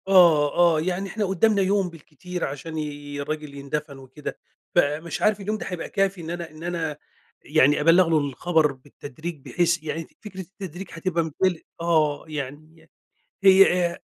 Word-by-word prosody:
آه، 170 Hz, -6 st, +6 dB, 0.2 s
آه، -, -, +1 dB
يعني 185 Hz, +3 st, -2 dB
إحنا 210 Hz, +2 st, -1 dB
قُدّامنا 200 Hz, +2 st, +3 dB
يوم 195 Hz, -1 st, +2 dB
بالكتير 170 Hz, +2 st, -6 dB
عشان 145 Hz, +4 st, -6 dB
ي 145 Hz, -1 st, -5 dB
الراجل 150 Hz, 0 st, -5 dB
يندَفن 140 Hz, 0 st, -4 dB
وكده، 135 Hz, +2 st, -8 dB, 0.4 s
فمش 155 Hz, 0 st, +1 dB
عارف 210 Hz, -1 st, +3 dB
اليوم 210 Hz, +2 st, -2 dB
ده -, -, -6 dB
هيبقى 180 Hz, -2 st, -5 dB
كافي 195 Hz, -2 st, 0 dB
إن 160 Hz, -, -7 dB
أنا 170 Hz, -1 st, -5 dB
إن 155 Hz, +1 st, -12 dB
أنا 165 Hz, -4 st, -2 dB, 0.5 s
يعني 150 Hz, -1 st, +4 dB
أبلّغ 165 Hz, +3 st, +5 dB
له 160 Hz, -, +4 dB
الخبر 150 Hz, +2 st, +1 dB
بالتدريج 145 Hz, +4 st, -8 dB
بحيث 170 Hz, -2 st, +1 dB
يعني 160 Hz, +1 st, -3 dB
ف -, -, -17 dB
فكرة 205 Hz, -4 st, -9 dB
التدريج 190 Hz, -1 st, -8 dB
هتبقى 170 Hz, 0 st, -1 dB
مبال 160 Hz, +2 st, 0 dB, 0.2 s
آه، 155 Hz, -4 st, +2 dB
يعني 155 Hz, +2 st, -7 dB, 0.5 s
هي 190 Hz, -2 st, +6 dB
آآ -, -, -10 dB
165 Hz, 160 wpm, -24 LUFS, 150-180 Hz, 0.5 s, آه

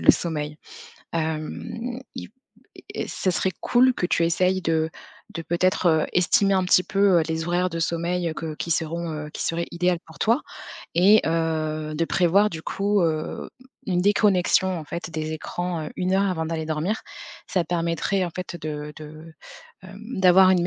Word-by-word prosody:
le -, -, +8 dB
sommeil. 150 Hz, -2 st, -3 dB, 0.6 s
Hem, 165 Hz, +10 st, -3 dB, 0.2 s
il -, -, -6 dB, 0.7 s
et -, -, -3 dB
ce 185 Hz, -, -1 dB
serait 190 Hz, -, 0 dB
cool 255 Hz, +1 st, +4 dB
que 175 Hz, -, -1 dB
tu 170 Hz, -, +2 dB
essayes 185 Hz, +2 st, +1 dB
de 160 Hz, -1 st, +1 dB, 0.4 s
de, 165 Hz, -, -4 dB
peut-être, 175 Hz, +3 st, +1 dB
heu, 160 Hz, -2 st, +4 dB
estimer 195 Hz, +2 st, +3 dB
un 185 Hz, -, +2 dB
petit 180 Hz, 0 st, +5 dB
peu, 195 Hz, -3 st, +3 dB
heu, -, -, +2 dB
les 160 Hz, 0 st, -2 dB
horaires 180 Hz, +1 st, +1 dB
de 165 Hz, 0 st, -3 dB
sommeil, 170 Hz, +1 st, -1 dB
heu, -, -, -6 dB
que 160 Hz, -1 st, -5 dB
qui 170 Hz, -, -5 dB
seront, 165 Hz, +1 st, -1 dB
heu 150 Hz, 0 st, -6 dB
qui -, -, -5 dB
seraient 170 Hz, +1 st, -1 dB
idéales 175 Hz, 0 st, +1 dB
pour 160 Hz, -2 st, -15 dB
toi 230 Hz, +5 st, +3 dB, 0.5 s
et 200 Hz, +5 st, +6 dB
heu, 155 Hz, -1 st, -1 dB
de 165 Hz, +2 st, +1 dB
prévoir, 190 Hz, +4 st, +3 dB
du 160 Hz, -1 st, -7 dB
coup, 200 Hz, 0 st, +1 dB
heu, 160 Hz, -1 st, -2 dB, 0.4 s
une 180 Hz, -2 st, +1 dB
déconnexion, 190 Hz, -2 st, +3 dB
en 155 Hz, -, -7 dB
fait, 170 Hz, +2 st, -6 dB
des 155 Hz, 0 st, -3 dB
écrans, 175 Hz, +1 st, -3 dB
heu, -, -, -7 dB
1 185 Hz, +1 st, 0 dB
heure 195 Hz, 0 st, +2 dB
avant 160 Hz, -3 st, -2 dB
d'aller 160 Hz, -1 st, -3 dB
dormir, 160 Hz, +7 st, -1 dB, 0.5 s
ça 180 Hz, -, +1 dB
permettrait 170 Hz, +3 st, 0 dB
en 175 Hz, -, -3 dB
fait 180 Hz, 0 st, -6 dB
de 150 Hz, -1 st, -5 dB
de, 155 Hz, +1 st, -11 dB, 0.5 s
hem 195 Hz, +4 st, -8 dB
d'avoir 185 Hz, 0 st, +7 dB
une 175 Hz, -2 st, +3 dB
170 Hz, 180 wpm, -24 LUFS, 160-185 Hz, 0.7 s, le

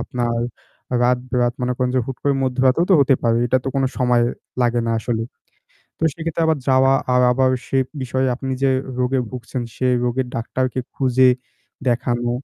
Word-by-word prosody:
আপনার 120 Hz, -1 st, -2 dB, 0.7 s
রাত-বেরাত, 125 Hz, 0 st, +1 dB
মনে 125 Hz, -, 0 dB
করেন 125 Hz, -1 st, 0 dB
যে -, -, +4 dB
হুট 135 Hz, -, -5 dB
করে 140 Hz, -1 st, +2 dB
মধ্যরাতেও 130 Hz, +5 st, +2 dB
তো -, -, +7 dB
হতে 135 Hz, -1 st, +4 dB
পারে। 115 Hz, -1 st, +2 dB
এটা 130 Hz, -, +2 dB
তো -, -, -1 dB
কোনো 135 Hz, -, +2 dB
সময় 125 Hz, -1 st, +3 dB, 0.4 s
লাগে 120 Hz, 0 st, +2 dB
না 115 Hz, -, +1 dB
আসলে। 115 Hz, -1 st, -2 dB, 0.8 s
তো -, -, -11 dB
সেক্ষেত্রে 165 Hz, 0 st, -3 dB
আবার 160 Hz, -2 st, +2 dB
যাওয়া 135 Hz, 0 st, +5 dB, 0.2 s
আর 125 Hz, -, +4 dB
আবার 130 Hz, +1 st, +2 dB, 0.2 s
সে 135 Hz, -, 0 dB, 0.2 s
বিষয়ে 130 Hz, +1 st, 0 dB
আপনি 130 Hz, +1 st, -4 dB
যে 135 Hz, -, +4 dB, 0.3 s
রোগে 125 Hz, +1 st, +1 dB
ভুগছেন, 125 Hz, 0 st, -5 dB
সে 130 Hz, -, 0 dB, 0.2 s
রোগের 125 Hz, +1 st, 0 dB
ডাক্তারকে 130 Hz, +2 st, -2 dB
খুঁজে 130 Hz, -1 st, +3 dB, 0.6 s
দেখানো, 120 Hz, 0 st, 0 dB
130 Hz, 170 wpm, -20 LUFS, 120-135 Hz, 0.8 s, তো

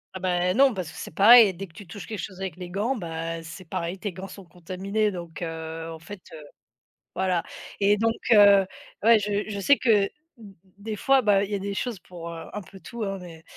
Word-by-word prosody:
Ah -, -, -4 dB
bah 180 Hz, 0 st, +1 dB
non, 265 Hz, -1 st, +4 dB
parce 180 Hz, -4 st, -5 dB
que -, -, -15 dB
c'est -, -, -6 dB
pareil, 220 Hz, -1 st, +8 dB
dès 195 Hz, +3 st, -6 dB
que 170 Hz, -, -21 dB
tu 205 Hz, 0 st, -12 dB
touches 195 Hz, +3 st, -9 dB
quelque 215 Hz, -3 st, -6 dB
chose 190 Hz, -1 st, -8 dB
avec 190 Hz, -4 st, -4 dB
les 180 Hz, -1 st, -7 dB
gants, 210 Hz, +8 st, -1 dB
bah 165 Hz, -3 st, -5 dB
c'est 165 Hz, +3 st, -10 dB
pareil. 170 Hz, +3 st, -3 dB
Tes 195 Hz, -1 st, -5 dB
gants 190 Hz, +2 st, -8 dB
sont 190 Hz, 0 st, -12 dB
contaminés 190 Hz, +5 st, -2 dB
donc 170 Hz, -3 st, -8 dB
heu, 165 Hz, 0 st, -5 dB
en 160 Hz, -, -7 dB
fait, 180 Hz, +3 st, -10 dB
heu 155 Hz, -1 st, -10 dB, 0.7 s
voilà 185 Hz, -3 st, 0 dB, 0.4 s
et 205 Hz, +1 st, +4 dB
donc 225 Hz, +1 st, +2 dB, 0.2 s
heu, 200 Hz, -2 st, +7 dB, 0.4 s
ouais 230 Hz, 0 st, +6 dB
je 205 Hz, 0 st, -1 dB
je 205 Hz, -2 st, -4 dB
sais 280 Hz, +8 st, +4 dB
que, 250 Hz, -, -1 dB, 0.5 s
d 205 Hz, -4 st, -14 dB, 0.2 s
des 215 Hz, +1 st, -5 dB
fois 270 Hz, +5 st, +3 dB
bah, 200 Hz, -2 st, +4 dB
il 205 Hz, -, -4 dB
y -, -, 0 dB
a 200 Hz, -, -2 dB
des 200 Hz, +1 st, -4 dB
choses 240 Hz, +1 st, -3 dB
pour, 175 Hz, -2 st, -9 dB
heu, 165 Hz, -1 st, -8 dB
un 210 Hz, -, -4 dB
peu 195 Hz, -, -14 dB
tout 225 Hz, +6 st, -7 dB
hein, 195 Hz, -1 st, -3 dB
mais 165 Hz, -2 st, -11 dB
195 Hz, 235 wpm, -25 LUFS, 170-210 Hz, 0.7 s, pareil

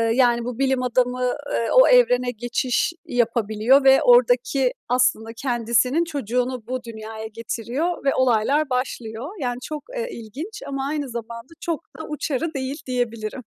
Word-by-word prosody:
yani, 240 Hz, -2 st, +3 dB
bu 250 Hz, 0 st, -5 dB
bilim 265 Hz, -1 st, +1 dB
adamı, 250 Hz, 0 st, +1 dB, 0.2 s
eee, 230 Hz, -, 0 dB
o -, -, +8 dB
evrene 250 Hz, -, +4 dB
geçiş 245 Hz, +6 st, -1 dB
yapabiliyor 235 Hz, +2 st, +2 dB
ve 270 Hz, 0 st, +6 dB
ordaki 485 Hz, -, +4 dB, 0.2 s
aslında 245 Hz, -3 st, +2 dB
kendisinin 245 Hz, +4 st, +1 dB
çocuğunu 250 Hz, -5 st, -2 dB
bu 255 Hz, 0 st, -3 dB
dünyaya 220 Hz, -1 st, -7 dB
getiriyor 235 Hz, +10 st, -3 dB
ve 275 Hz, -, +2 dB
olaylar 260 Hz, +4 st, +2 dB
başlıyor. 250 Hz, 0 st, -3 dB
Yani, 245 Hz, -2 st, -2 dB
çok, 300 Hz, -1 st, -5 dB
eee, 475 Hz, 0 st, -2 dB
ilginç 290 Hz, -, -8 dB
ama 275 Hz, 0 st, -3 dB
aynı 290 Hz, -3 st, -3 dB
zamanda 235 Hz, +4 st, -7 dB
çok 335 Hz, -2 st, -3 dB
da 320 Hz, -, -6 dB
uçarı 305 Hz, +1 st, -2 dB
değil, 270 Hz, +1 st, -3 dB
diyebilirim. 240 Hz, -1 st, -3 dB
250 Hz, 140 wpm, -23 LUFS, 235-280 Hz, 0.2 s, o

